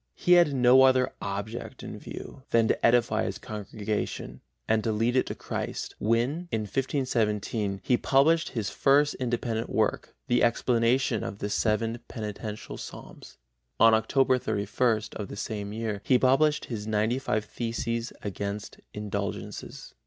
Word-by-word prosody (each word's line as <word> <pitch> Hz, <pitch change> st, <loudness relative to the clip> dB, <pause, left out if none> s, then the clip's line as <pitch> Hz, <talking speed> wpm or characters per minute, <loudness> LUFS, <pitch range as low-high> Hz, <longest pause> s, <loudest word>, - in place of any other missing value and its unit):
He 180 Hz, -, -1 dB
had 175 Hz, -4 st, +7 dB
no 125 Hz, +1 st, +6 dB
other 130 Hz, -1 st, +4 dB
object 100 Hz, +4 st, -5 dB
in -, -, -7 dB
view 135 Hz, -, -9 dB
than 115 Hz, -1 st, +3 dB
to -, -, 0 dB
edify 120 Hz, -1 st, +3 dB
his -, -, -3 dB
congregation 105 Hz, -, -4 dB, 0.3 s
and 110 Hz, -1 st, +2 dB
to 115 Hz, -, 0 dB
lead 115 Hz, +3 st, +1 dB
it 130 Hz, -, +2 dB
to -, -, -4 dB
Christ -, -, -4 dB
when, 120 Hz, -, 0 dB
in 110 Hz, -, 0 dB
1517, 110 Hz, -4 st, -1 dB
he 125 Hz, -, +3 dB
published 160 Hz, +7 st, +3 dB
his 110 Hz, -5 st, -3 dB
first 145 Hz, +1 st, +3 dB
independent 120 Hz, -2 st, -2 dB
work, -, -, -1 dB
the 120 Hz, 0 st, +2 dB
Explanation 120 Hz, 0 st, +2 dB
of 100 Hz, -, -5 dB
the 105 Hz, 0 st, -4 dB
Seven 115 Hz, +2 st, 0 dB
Penitential 105 Hz, -1 st, -6 dB
Psalms. -, -, -10 dB, 0.4 s
On 115 Hz, 0 st, +7 dB
Oct 130 Hz, +3 st, +3 dB
31 110 Hz, +1 st, -1 dB
of 100 Hz, -, -5 dB
the -, -, -8 dB
same 105 Hz, -1 st, -4 dB
year 110 Hz, -2 st, -3 dB
he 130 Hz, -, +4 dB
published 135 Hz, +4 st, +3 dB
his 110 Hz, -3 st, -5 dB
95 110 Hz, +1 st, 0 dB
Theses 115 Hz, +1 st, -3 dB
against 100 Hz, 0 st, -5 dB, 0.2 s
Indulgences. 100 Hz, -1 st, -5 dB
115 Hz, 145 wpm, -27 LUFS, 105-130 Hz, 0.4 s, had